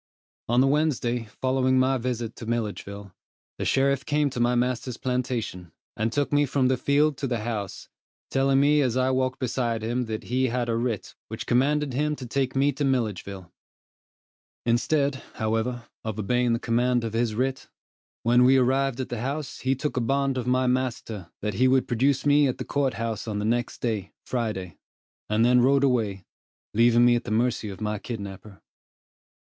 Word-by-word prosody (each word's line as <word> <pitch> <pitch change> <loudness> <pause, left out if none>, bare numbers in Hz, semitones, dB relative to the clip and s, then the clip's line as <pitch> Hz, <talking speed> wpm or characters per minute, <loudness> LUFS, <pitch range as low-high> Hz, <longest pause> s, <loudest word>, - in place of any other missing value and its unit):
On 120 +2 +4
the 135 - +4
Wednesday 135 -5 +1
following 130 +4 0
my 130 0 +2
visit 120 -2 -3
to 115 - -8
Milledgeville, 100 -4 -4 0.5
the - - -2
sheriff 140 0 +2
came 145 -1 +1
to 125 - -5
my 120 +1 +2
master's 125 0 -1
plantation, 125 -9 -3 0.2
and 110 +1 -1
took 145 +3 -1
me 145 0 +3
from 135 -1 +2
the 130 - +3
field 140 +3 +2
to 140 - -2
the 120 -3 -2
house, 105 -4 -4 0.4
telling 135 0 +3
me 145 +1 +4
as 125 -3 +1
I 130 0 +2
walked 130 0 0
beside 120 -3 -1
him 120 +2 -1
that 110 -1 -4
he 130 +2 0
had 120 0 -1
a 115 - +1
writ 115 -3 -2
which - - -6
commanded 140 +3 +1
him 150 +3 0
to 130 - -8
take 130 +2 -1
me 140 +2 +3
to 145 +2 -3
Milledgeville. 105 -8 -2 1.1
Instead, 135 +3 +1
however, 115 +2 -1 0.2
of 110 -2 -4
obeying 120 +3 +1
the - - +2
command 120 +1 +1
of 115 -1 -4
his 115 -1 0
writ, 130 +3 -2 0.5
when 120 +2 +5
we 130 +2 +6
arrived 130 0 +1
at 130 - -3
the 120 -2 -4
house 140 +3 -4
he 130 +1 +1
took 145 +1 -3
a - - +2
bond 135 +2 +1
of 125 -2 -3
my 130 +1 +2
master 120 -7 -2
that 105 -1 -1
he 125 +7 +3
would 130 0 +3
produce 135 +4 +1
me 145 0 +5
at 130 - -2
the - - -5
court 140 -2 0
house 115 -1 -3
on 105 -2 -2
the 105 - -2
next 120 +2 -1
day, 110 -5 -2
Friday, 105 -9 -3 0.5
and 110 +2 +3
then 125 0 +5
rode 135 +2 +4
away, 110 -8 0 0.5
leaving 120 +2 +5
me 120 0 +5
at 120 - -1
the - - -6
mercy 115 0 0
of 95 - -8
my 105 -1 -2
kidnapper. 100 -3 -8
125 Hz, 185 wpm, -26 LUFS, 115-135 Hz, 1.1 s, we